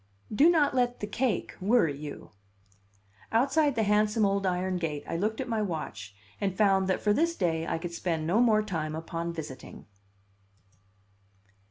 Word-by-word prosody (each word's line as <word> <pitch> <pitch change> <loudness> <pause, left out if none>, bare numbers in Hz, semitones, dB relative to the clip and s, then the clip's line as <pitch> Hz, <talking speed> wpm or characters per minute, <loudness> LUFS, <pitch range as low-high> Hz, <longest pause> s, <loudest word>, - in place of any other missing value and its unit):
"Do 290 +10 +6
not 305 -5 +3
let 245 -1 0
the - - -3
cake 235 +2 -1
worry 195 -7 +3
you." 145 +1 -9 1.0
Outside 280 +4 +2
the 225 - +1
handsome 210 +1 +2
old 195 0 +1
iron 185 0 -1
gate 155 -4 -3
I - - -3
looked 215 +6 -1
at 260 - -3
my 225 -2 -1
watch 105 - -5 0.3
and 195 -2 -1
found 195 -3 +3
that 190 - 0
for 210 - +2
this 335 +8 +1
day 165 - -1
I - - -1
could 170 +1 -6
spend 165 -2 -2
no 180 +7 +2
more 215 -3 +4
time 160 -7 -3
upon 165 +1 -4
visiting. 155 -6 -9
195 Hz, 165 wpm, -28 LUFS, 165-225 Hz, 1.0 s, Do